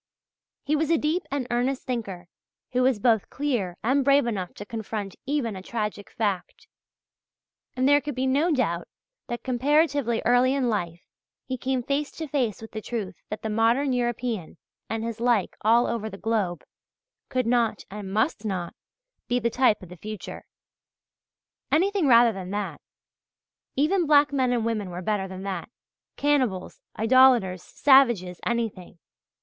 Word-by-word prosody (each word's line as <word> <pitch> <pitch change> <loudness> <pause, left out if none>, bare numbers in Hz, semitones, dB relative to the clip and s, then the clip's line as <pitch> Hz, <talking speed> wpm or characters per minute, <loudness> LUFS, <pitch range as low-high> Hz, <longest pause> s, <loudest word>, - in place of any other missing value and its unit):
He 295 +2 +1
was 305 0 0
a 335 - +4
deep 320 +5 -1
and 275 -2 -2
earnest 250 +2 0
thinker 200 -8 -4 0.4
who 250 - +1
was 255 -2 +3
both 220 -1 +2
clear 240 -11 -2
and 265 +5 +2
brave 275 0 +4
enough 195 -6 -3
to 205 - -8
confront 215 -3 -5
even 270 -7 -1
a 190 - -7
tragic 210 -1 -4
fact. 205 -5 -3 1.1
And 255 +1 +2
there 290 +1 +5
can 290 -2 -5
be 260 +1 -1
no 285 +6 +2
doubt 200 - 0 0.4
that 240 - -5
comparatively 275 -1 +2
early 245 +2 +4
in 260 -3 +1
life 175 -5 -2 0.4
he 260 - -3
came 255 0 -2
face 280 +3 -1
to 320 - -6
face 250 -7 -1
with 225 - -10
the 215 - -5
truth 210 -4 -4 0.2
that 215 - -6
the 220 - -2
modern 235 +5 +2
European 240 -7 -2 0.3
and 225 0 -2
his 230 -1 -4
like 235 -5 +1
all 230 +3 +4
over 220 -2 -2
the 195 - -9
globe, 205 -5 -1 0.7
could 255 -2 0
not 235 -1 +1
and 200 -1 -6
must 220 +2 0
not, 185 -5 -3 0.5
be 245 - +1
the 235 -1 0
type 250 -6 +2
of 180 - -11
the 180 - -11
future. 210 +1 -8 1.3
Anything 375 0 +2
rather 235 -2 +6
than 190 -2 -7
that! 205 0 -4 0.9
Even 330 +5 +2
black 290 -1 +5
men 260 -3 +2
and 235 -2 0
women 215 -4 -2
were 180 +1 -6
better 200 -1 -1
than 190 0 -8
that 195 +1 -4 0.5
cannibals, 255 -11 0 0.2
idolators, 230 -6 +4
savages, 235 -12 +3
anything! 225 -7 -3
235 Hz, 160 wpm, -26 LUFS, 205-265 Hz, 1.3 s, rather